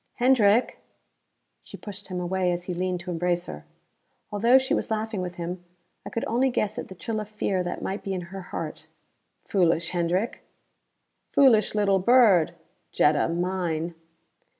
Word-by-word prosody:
"Hendrick 240 -3 +3 0.4
" - - -50
She - - -11
pushed 205 -1 -9
him 185 -2 -4
away 180 0 0
as 175 0 -3
he 180 - -4
leaned 180 0 -2
to 180 0 -6
embrace 175 +1 0
her. 75 0 -9 0.7
Although 230 +5 +5
she 265 0 0
was - - -1
laughing 220 -2 -2
with 180 -1 -5
him, 175 +1 -5 0.4
I - - -5
could 230 - -3
only 250 +4 +2
guess 215 -2 -1
at - - -6
the 190 - -10
chill 215 +4 -3
of 215 -1 -6
fear 200 -3 -1
that 175 0 -4
might 195 +2 -3
be 195 -1 -3
in 180 - -3
her 195 - -5
heart. 180 - -6 0.6
"Foolish, 170 -3 +1
Hendrick!" 180 +5 -1 0.9
"Foolish 230 -7 +4
little 200 -2 +3
bird, 205 -6 +5 0.4
Jetta 150 0 +3
mine." 170 -1 -2
190 Hz, 165 wpm, -26 LUFS, 175-215 Hz, 0.9 s, Although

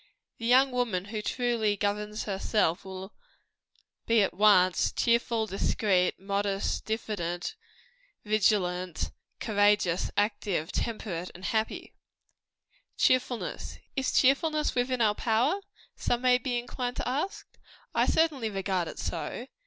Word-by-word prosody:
The 230 - -3
young 260 +2 +5
woman 230 -7 -1
who 215 +1 -4
truly 230 -3 0
governs 210 +2 -2
herself, 195 -3 0
will 190 +1 -8 0.9
be 230 -2 +5
at 195 - -1
once 185 -3 +4
cheerful, 235 -1 +1
discreet, 195 -2 +1
modest, 200 0 -1
diffident, 175 -6 -3 0.7
vigilant, 185 -5 +1 0.3
courageous, 205 -4 +2
active, 205 -6 0
temperate 185 -6 -3
and 185 +2 -9
happy. 220 +4 -2 1.0
Cheerfulness. 255 -2 0 0.2
Is 265 -2 0
cheerfulness 300 +3 +3
within 250 0 0
our 215 -2 +4
power? 240 - +1 0.3
some 245 +1 -1
may 250 -1 +5
be 245 -1 -2
inclined 245 +1 -4
to - - -3
ask. 290 +10 -2 0.5
I - - +2
certainly 295 -9 +2
regard 190 -3 -1
it - - -8
so. 240 - -4
215 Hz, 115 wpm, -29 LUFS, 195-245 Hz, 1.0 s, young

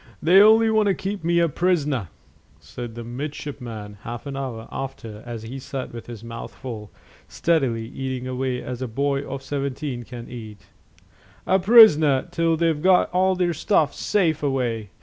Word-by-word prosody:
"They 180 +5 +6
only 220 +1 +6
want 215 -1 +3
to 195 - +2
keep 195 -2 -4
me 170 +1 +2
a 170 0 +4
prisoner," 150 - 0 0.5
said 120 -2 -8
the 120 - -6
midshipman 120 -5 -7
half 120 +3 -7
an 140 -1 -5
hour 125 -5 -5
after, 115 -5 -6
as 115 -2 -6
he 125 +4 -7
sat 130 -1 -6
with 115 - -9
his 115 -2 -9
mouth 115 0 -8
full, 110 -5 -7 0.4
steadily 135 -9 0
eating 130 0 -5
away 130 0 -2
as 125 0 -6
a 130 - -2
boy 140 +4 -1
of 135 -1 -6
seventeen 140 -2 -3
can 120 0 -9
eat 110 -4 -9 0.8
"a 190 +1 +3
prisoner 170 - +6
till 165 -1 +1
they've 165 -2 +1
got 185 +1 +4
all 185 +1 +2
their 180 -1 +1
stuff 155 -2 +1
safe 165 -7 0
away. 125 -7 -1
135 Hz, 170 wpm, -23 LUFS, 120-165 Hz, 0.8 s, They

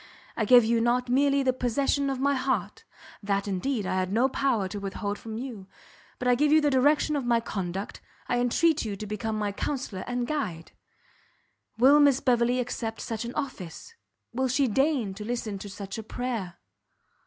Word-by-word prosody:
I 220 - 0
give 245 +1 +7
you 230 0 +2
not 245 +1 +1
merely 275 +2 +3
the 255 -1 +2
possession 275 +3 0
of 265 -1 -2
my 280 +1 +2
heart, 255 -7 -2 0.4
that, 200 -1 -1
indeed, 205 +3 -1
I - - -1
had 185 0 -1
no 235 +5 +3
power 255 -8 0
to 205 +2 -6
withhold 200 +1 -4
from 220 -1 -7
you, 230 -6 -7 0.5
but 250 - -3
I 250 - +5
give 295 +4 +2
you 310 - +7
the 295 -1 +2
direction 290 +3 +3
of 280 - -1
my 240 -1 +2
conduct, 195 -1 -5 0.3
I 245 - +1
entreat 305 +6 +2
you 210 -3 -3
to 210 - -7
become 215 +1 -3
my 210 -1 -1
counsellor 210 -3 -4
and 245 0 -1
guide. 205 - -3 1.1
Will 270 +5 +6
Miss 285 -3 +5
Beverley 245 0 +2
accept 235 -2 -3
such 225 0 -4
an 235 - -6
office? 265 - -6 0.4
Will 260 +2 0
she 260 +2 +2
deign 265 -3 +1
to 205 +2 -8
listen 220 -3 -3
to 205 - -8
such 200 +1 -7
a - - -6
prayer?" 225 -6 -4
240 Hz, 190 wpm, -27 LUFS, 205-270 Hz, 1.1 s, give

